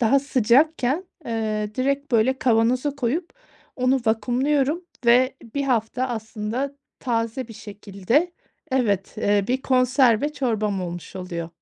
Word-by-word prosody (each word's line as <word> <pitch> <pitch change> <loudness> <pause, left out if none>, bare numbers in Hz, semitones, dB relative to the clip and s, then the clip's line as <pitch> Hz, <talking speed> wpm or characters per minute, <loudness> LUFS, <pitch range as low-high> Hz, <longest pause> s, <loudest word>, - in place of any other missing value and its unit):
Daha 245 +4 +4
sıcakken, 275 - +2 0.2
eee, 215 -2 -2
direkt 275 +1 -1
böyle 245 +4 +3
kavanoza 245 +4 +2
koyup 285 +7 -1 0.5
onu 255 +1 +2
vakumluyorum. 270 +8 +1 0.2
Ve 255 +3 +4 0.2
1 280 - 0
hafta 250 0 0
aslında 225 +4 -4 0.2
taze 230 0 -2
bir - - -9
şekilde, 205 - -1 0.4
evet, 205 -7 0
eee, 205 -1 +2
bir 260 +2 0
konserve 255 +1 +3
çorbam 215 -8 -1
olmuş 175 +1 -7
oluyor. 170 -3 -5
245 Hz, 120 wpm, -23 LUFS, 215-270 Hz, 0.5 s, Daha